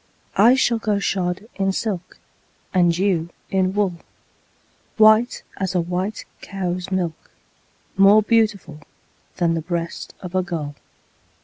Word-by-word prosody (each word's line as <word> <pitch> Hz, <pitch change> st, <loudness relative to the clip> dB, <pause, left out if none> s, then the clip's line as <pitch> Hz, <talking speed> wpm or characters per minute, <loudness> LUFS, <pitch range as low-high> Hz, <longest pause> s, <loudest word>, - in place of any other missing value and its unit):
I 225 Hz, +6 st, +6 dB
shall 240 Hz, -3 st, +2 dB
go 210 Hz, -2 st, 0 dB
shod 185 Hz, 0 st, -2 dB
in 195 Hz, 0 st, +1 dB
silk, 190 Hz, -4 st, -4 dB, 0.6 s
And 175 Hz, -2 st, +3 dB
you 180 Hz, -4 st, 0 dB, 0.2 s
in 190 Hz, -1 st, +2 dB
wool, 195 Hz, -4 st, 0 dB, 1.0 s
White 220 Hz, +2 st, +5 dB
as 190 Hz, -1 st, -2 dB
a -, -, +3 dB
white 180 Hz, +5 st, -3 dB, 0.2 s
cow's 180 Hz, -2 st, -4 dB
milk, 180 Hz, -4 st, -3 dB, 0.7 s
More 200 Hz, +2 st, +6 dB
beautiful 210 Hz, -8 st, +1 dB, 0.6 s
Than 170 Hz, -2 st, +1 dB
the 165 Hz, -, -1 dB
breast 170 Hz, +1 st, -5 dB
of 180 Hz, -1 st, -8 dB
a 185 Hz, -, +2 dB
gull. 165 Hz, -5 st, -4 dB
185 Hz, 125 wpm, -21 LUFS, 175-205 Hz, 1.0 s, I